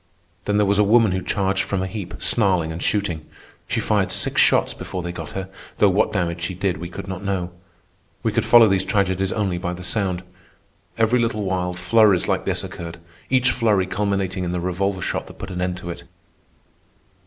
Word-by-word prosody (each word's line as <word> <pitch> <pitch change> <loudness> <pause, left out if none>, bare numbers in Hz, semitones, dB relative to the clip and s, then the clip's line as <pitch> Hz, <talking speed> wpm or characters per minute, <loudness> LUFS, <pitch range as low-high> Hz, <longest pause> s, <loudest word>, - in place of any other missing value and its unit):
Then 105 0 +1
there 105 - +4
was 100 +1 +2
a - - +6
woman 110 0 +4
who 95 0 -1
charged 95 0 0
from 95 -1 -2
a - - -1
heap, 95 -1 -6
snarling 95 -8 +2
and 80 +1 -6
shooting. 95 -7 -1 0.4
She - - -1
fired - - +1
six - - +3
shots - - +4
before 90 -2 -6
they 85 - -4
got 85 -3 -8
her, 95 0 -4 0.3
though 100 - +5
what 95 - +2
damage 85 -3 -2
she 85 +2 -3
did 95 -2 -1
we 85 +1 -6
could 90 - -8
not 95 0 -6
know. 95 -3 -2 0.7
We - - +1
could - - +1
follow 120 -2 +7
these 95 -1 +2
tragedies 95 -1 0
only 95 -5 -1
by 90 -1 -3
the 90 +1 -8
sound. 95 -2 -1 0.7
Every 115 +2 +3
little 115 -3 0
while 90 -2 -1
flurries 100 +1 +3
like - - 0
this - - 0
occurred, 85 0 -7 0.3
each 130 -1 +3
flurry 105 -6 +2
culminating 95 -1 -1
in 90 0 -2
the 90 - -1
revolver 90 +1 -1
shot - - -3
that - - -13
put 95 - -7
an 90 0 -4
end 90 0 -1
to 85 -1 -6
it. 85 0 -9
95 Hz, 205 wpm, -22 LUFS, 90-100 Hz, 0.7 s, follow